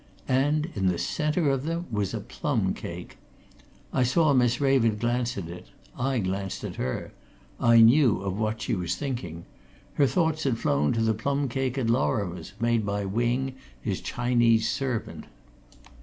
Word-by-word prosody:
And 150 +5 +1
in 95 -2 0
the 90 -2 +1
centre 150 - 0
of 135 -1 -1
them 165 +2 -2
was 105 -3 -1
a - - -2
plum - - -1
cake. - - -8 0.8
I - - +2
saw 145 +4 +3
Miss 120 -2 +3
Raven 130 -6 +3
glance 120 +1 -1
at 90 -4 -4
it; 90 +1 -9 0.3
I 130 +1 0
glanced 95 -1 -3
at - - -6
her; 65 - -3 0.5
I 115 -1 +6
knew 120 0 +6
of 95 -1 -2
what 110 +1 -2
she - - -1
was 90 -3 -1
thinking. 95 - -5 0.5
Her 140 - +3
thoughts 160 0 +1
had 130 -5 +1
flown 70 -7 +1
to 115 - 0
the 110 0 +2
plum 140 +6 -1
cake 130 +1 -2
at 130 - 0
Lorrimore's, 100 -8 -1
made 115 -1 +2
by 100 0 -2
Wing, 120 +6 0 0.3
his - - -3
Chinese 120 -2 +2
servant. 130 -5 -3
120 Hz, 165 wpm, -26 LUFS, 105-135 Hz, 0.8 s, I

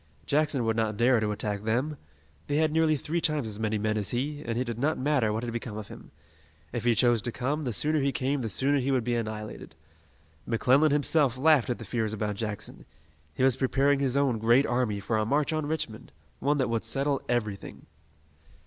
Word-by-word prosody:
Jackson 145 -4 +1
would 110 0 +1
not 110 -2 -1
dare 120 +1 +4
to 110 -1 -1
attack 105 -1 -2
them. 125 +8 -1 0.5
They 145 - -1
had 155 0 +2
nearly 160 0 +3
three 160 +4 -2
times 155 -7 0
as 105 -1 -5
many 110 -1 0
men 110 +1 -1
as 100 - -2
he, 145 +4 -2
and 115 0 -3
it 125 - +1
did 120 -2 -5
not 150 +5 +1
matter 130 -5 +1
what 110 +2 -2
had 120 -1 -4
become 115 -2 -5
of 105 -1 -7
him. - - -12 0.6
If 120 -1 -3
he 120 -1 +4
chose 120 -1 +3
to 120 - -4
come, 140 +6 -2
the 130 -5 -2
sooner 150 +6 +1
he 140 0 +1
came, 135 +1 -1
the 115 - -3
sooner 140 +8 +1
he 130 +1 -1
would 130 -3 +1
be 120 +1 -1
annihilated. 110 -5 -5 0.7
McClellan 130 +6 +3
himself 145 -3 +2
laughed 145 -2 +4
at 120 - -1
the 115 - -9
fears 110 0 -2
about 105 -1 -2
Jackson. 105 0 -5 0.5
He - - 0
was 130 -2 +4
preparing 135 +1 +2
his 135 -1 0
own 135 -5 +1
great 120 +5 +4
army 120 -4 0
for 110 +2 0
a - - +1
march 145 +7 +1
on 155 -2 -1
Richmond, 140 - -4 0.3
one 145 +1 +1
that 130 - +1
would 115 -1 -1
settle 135 +4 +1
everything. 105 -5 -3
125 Hz, 215 wpm, -28 LUFS, 110-145 Hz, 0.7 s, dare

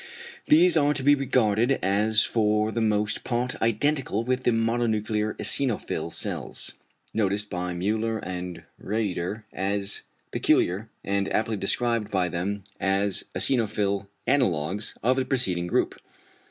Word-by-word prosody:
These 170 +2 +6
are 145 -1 +3
to 135 - -3
be 145 +2 +6
regarded 125 -3 +2
as 105 +3 +4
for 105 -1 +1
the 115 - -1
most 105 -1 +1
part 125 0 -2
identical 115 0 +1
with 130 +1 -1
the - - +5
mononuclear 115 -2 0
eosinophil 130 -6 -1
cells, - - -4 0.4
noticed 105 -1 0
by 90 0 -3
Müller 110 +5 -1
and 90 -1 -5 0.2
Rieder 105 -1 -2
as 100 +1 -1 0.3
peculiar, 100 +5 +1
and 100 0 -1
aptly 110 0 0
described 110 +2 0
by 95 -3 +1
them 95 +4 -3 0.2
as 95 0 0
the - - -2
eosinophil 105 -5 +1 0.2
analogues 100 - 0
of 130 +3 +3
the 130 - +2
preceding 95 -10 0
group. - - 0
105 Hz, 130 wpm, -26 LUFS, 100-120 Hz, 0.4 s, These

